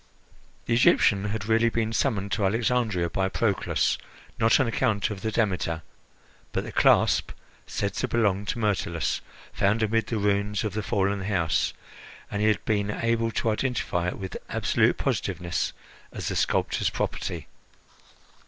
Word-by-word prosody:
The 120 - 0
Egyptian 105 -4 +4
had 105 0 -3
really 115 +1 +3
been 115 -1 -1
summoned 100 -6 0
to 100 - 0
Alexandria 110 -3 +1
by 95 0 0
Proclus, 100 0 0 0.4
not 115 +4 +4
on 135 - +3
account 110 -3 0
of 100 -2 -6
the 110 - -2
Demeter, 90 -7 0 0.7
but - - 0
the - - -7
clasp - - +4 0.4
said 100 -1 -2
to - - -1
belong 105 -4 +1
to - - -1
Myrtilus, 100 -7 -1 0.3
found 105 +3 +2
amid 115 +1 +1
the 115 - -1
ruins 105 +1 0
of 110 - -2
the 110 - -1
fallen 100 -2 0
house, 85 -6 +1 0.6
and 105 - -2
he 105 - +3
had 105 -3 +1
been 105 -2 0
able 115 +1 0
to 115 0 0
identify 105 -7 -1
it 90 - -3
with 95 -1 -6
absolute - - +2
positiveness 90 -2 -1 0.4
as - - -4
the - - -3
sculptor's - - +1
property. - - -3
105 Hz, 155 wpm, -26 LUFS, 95-115 Hz, 0.7 s, Egyptian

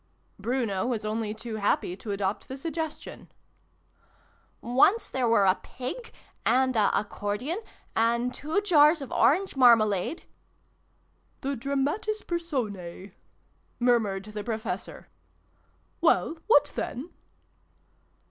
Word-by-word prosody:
Bruno 225 -3 -1
was 230 -4 -2
only 215 0 -2
too 220 +1 -6
happy 200 -3 0
to 215 - -9
adopt 200 0 -2
the 265 - -6
suggestion. 320 +1 -5 0.7
" - - -37 0.6
Once 270 - +3
there 255 -2 0
were 225 -3 +4
a 185 0 +3
Pig, 260 - -7 0.3
and 260 +2 +2
a 215 -2 +4
Accordion, 210 - -3 0.3
and 235 +2 +1
two 315 +8 -1
Jars 315 -5 +5
of 270 - -9
Orange 375 +5 +3
marmalade 230 - +4 0.6
" - - -41
The 275 +1 -2
dramatis 280 - -1
persons" 210 - -4 0.7
murmured 220 -6 +2
the 210 -1 -6
Professor. 220 -1 -5 0.5
" - - -40
Well, 325 - +2
what 455 - +5
then 275 +9 -4
245 Hz, 115 wpm, -27 LUFS, 210-295 Hz, 0.7 s, Jars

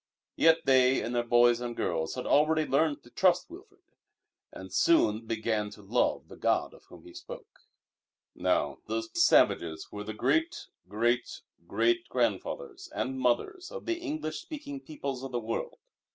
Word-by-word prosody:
Yet 165 0 +4
they 130 -1 +4
and 120 - -4
their 120 - +2
boys 120 0 +4
and 120 -1 -4
girls 80 -2 -2
had 125 - -5
already 155 +1 +3
learned 145 +1 +1
to 120 - -18
trust 180 - +2
Wilfrid, 385 +1 -14 0.7
and - - -10
soon 115 - +3
began 110 -2 -1
to 105 0 -14
love 100 +4 0
the - - -12
God - - 0
of - - -18
Whom - - -15
he 345 - -13
spoke. - - -11 0.7
Now, - - 0
those 330 +1 -3
savages 85 - +3
were 105 0 -6
the 110 0 -6
great, 330 - 0 0.2
great, 120 +4 0 0.3
great 355 0 +1
grandfathers 400 -7 -2
and 130 0 -2
mothers 355 - 0
of - - -8
the 345 0 -1
English 305 - -4
speaking 285 -2 -7
peoples 140 - -6
of 135 - -6
the 120 - -1
world. 115 0 -4
140 Hz, 160 wpm, -29 LUFS, -, 0.7 s, Yet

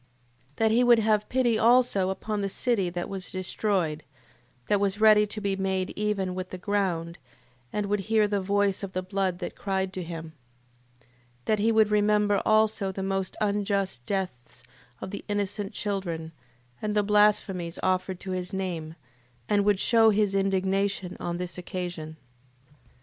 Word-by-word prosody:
That 220 -1 +2
he 240 +3 +4
would 240 -1 +6
have 215 -1 +1
pity 240 -4 +2
also 235 -5 +4
upon 210 +2 -3
the 200 - -1
city 205 -4 0
that 175 0 -4
was 190 -2 -6
destroyed, 185 -4 -1 0.6
that 205 - +2
was 200 0 0
ready 215 -1 +6
to 215 - -5
be 200 -2 -1
made 190 -1 -1
even 205 -3 -1
with 185 0 -5
the 185 - -6
ground, 180 -4 -2 0.5
and 210 -1 -1
would 205 +1 0
hear 220 -2 +4
the 205 -1 -1
voice 200 0 +1
of 195 -2 -6
the 185 - -2
blood 190 -1 -1
that 180 - -6
cried 190 -1 -2
to 185 - -4
him: 165 -2 -7 0.7
8:4. - - -29 0.4
That 215 +4 +1
he 225 +2 +3
would 220 -1 +4
remember 210 -1 +3
also 215 -2 +3
the 190 0 -5
most 195 -1 -2
unjust 200 - -1
deaths 130 -11 -4 0.4
of 190 - -6
innocent 205 -1 -2
children, 175 -6 -3 0.5
and 210 0 -2
the 210 - +3
blasphemies 205 -4 +2
offered 185 0 0
to 190 - -5
his 180 -1 -3
name, 170 -5 -4 0.5
and 205 -1 +2
would 205 -2 +3
shew 225 0 +5
his 210 -2 +2
indignation 195 -1 0
on 175 0 -3
this 180 0 -5
occasion. 175 -4 -5 0.5
8:5. 145 - -27
195 Hz, 165 wpm, -27 LUFS, 185-210 Hz, 0.7 s, would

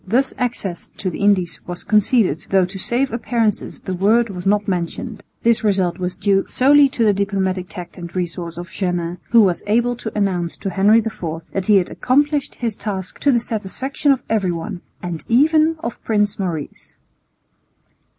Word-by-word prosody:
Thus 255 +7 +1
access 220 -8 -3
to 185 - -2
the - - -7
Indies 200 -4 +2
was 175 0 -5
conceded, 210 - +2
though 190 -1 +4
to 190 +2 -8
save 245 +5 0
appearances 230 -3 -1
the 190 - -4
word 215 +5 +2
was 180 0 -5
not 205 +1 +2
mentioned. 200 +4 -3 0.2
This 235 0 +3
result 190 -4 +1
was 180 0 -3
due 195 -1 +2
solely 285 +2 +5
to 235 -3 0
the 210 - +4
diplomatic 190 -2 -1
tact 180 0 -9
and 170 0 -8
resource 170 -2 -3
of 175 0 -7
Jeannin, 175 -2 -2
who 230 -2 +6
was 180 -4 +1
able 240 +3 +2
to 220 -3 -6
announce 180 -4 -1
to 195 - -4
Henry 200 +4 +4
IV 165 -7 -5
that 195 -1 -2
he 210 - +6
had 180 - 0
accomplished 290 +2 +1
his 230 -4 -2
task 190 -4 -5
"to 285 - +3
the 240 - +3
satisfaction 235 +6 -1
of 270 - 0
everyone, 180 -5 -2 0.2
and 175 -3 -4
even 310 +6 +4
of 235 - -5
Prince 210 -2 0
Maurice." 165 -6 -5
200 Hz, 175 wpm, -20 LUFS, 180-235 Hz, 0.2 s, who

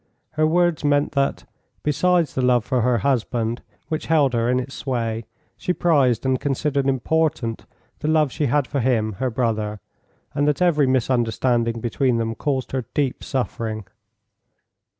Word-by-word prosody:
Her 155 0 +2
words 175 -1 +2
meant 145 0 +2
that, 140 -1 0 0.4
besides 170 +2 +2
the 130 - -1
love 125 -2 +3
for 130 -3 +1
her 125 +1 +2
husband 120 -2 -1 0.3
which 155 - -3
held 150 -5 +3
her 115 0 +1
in 125 0 +2
its 130 +2 -6
sway, 115 -4 -3 0.3
she 180 - -1
prized 140 -10 +2
and 130 -1 +1
considered 140 0 0
important 135 -3 0 0.3
the - - -3
love 155 -3 +3
she 150 0 -1
had 145 +2 +2
for 140 +2 -2
him, 115 -4 +1
her 130 - 0
brother, 110 -4 -1 0.5
and 145 +1 +1
that 150 -2 +1
every 160 -6 +3
misunderstanding 120 -2 +1
between 120 +1 +1
them 115 0 -1
caused 135 +1 -2
her 130 -3 -2
deep 140 -4 0
suffering. 115 -5 -3
130 Hz, 155 wpm, -22 LUFS, 115-145 Hz, 0.5 s, love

